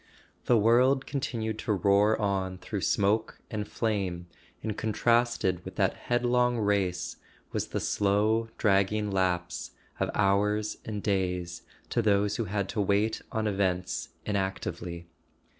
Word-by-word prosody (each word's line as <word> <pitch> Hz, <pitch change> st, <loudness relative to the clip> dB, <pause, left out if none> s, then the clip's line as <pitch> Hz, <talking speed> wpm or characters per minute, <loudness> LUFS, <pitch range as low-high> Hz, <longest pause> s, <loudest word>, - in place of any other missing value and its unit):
The 120 Hz, -, +5 dB
world 125 Hz, +5 st, +4 dB
continued 110 Hz, -5 st, -3 dB
to 110 Hz, -, 0 dB
roar 100 Hz, +3 st, +3 dB
on 95 Hz, -3 st, -1 dB
through 95 Hz, +2 st, -5 dB
smoke 105 Hz, +4 st, +1 dB
and 105 Hz, -1 st, -3 dB
flame, 95 Hz, -6 st, -2 dB, 0.4 s
and 110 Hz, -1 st, -2 dB
contrasted 110 Hz, -5 st, +1 dB
with -, -, -8 dB
that -, -, +2 dB
headlong 125 Hz, 0 st, +1 dB
race 100 Hz, -4 st, 0 dB, 0.3 s
was -, -, -2 dB
the -, -, -2 dB
slow 105 Hz, +3 st, +1 dB
dragging 105 Hz, 0 st, +2 dB
lapse 90 Hz, -3 st, -1 dB, 0.3 s
of -, -, 0 dB
hours 105 Hz, +1 st, +2 dB
and 105 Hz, -2 st, -4 dB
days 90 Hz, -3 st, -1 dB, 0.3 s
to 120 Hz, -, +1 dB
those 105 Hz, -1 st, +2 dB
who 115 Hz, -, -1 dB
had 100 Hz, 0 st, -1 dB
to 110 Hz, -, -1 dB
wait 100 Hz, +3 st, +1 dB
on 110 Hz, 0 st, -1 dB
events 95 Hz, -3 st, -1 dB, 0.2 s
inactively. 95 Hz, -3 st, -3 dB
105 Hz, 130 wpm, -28 LUFS, 95-110 Hz, 0.4 s, The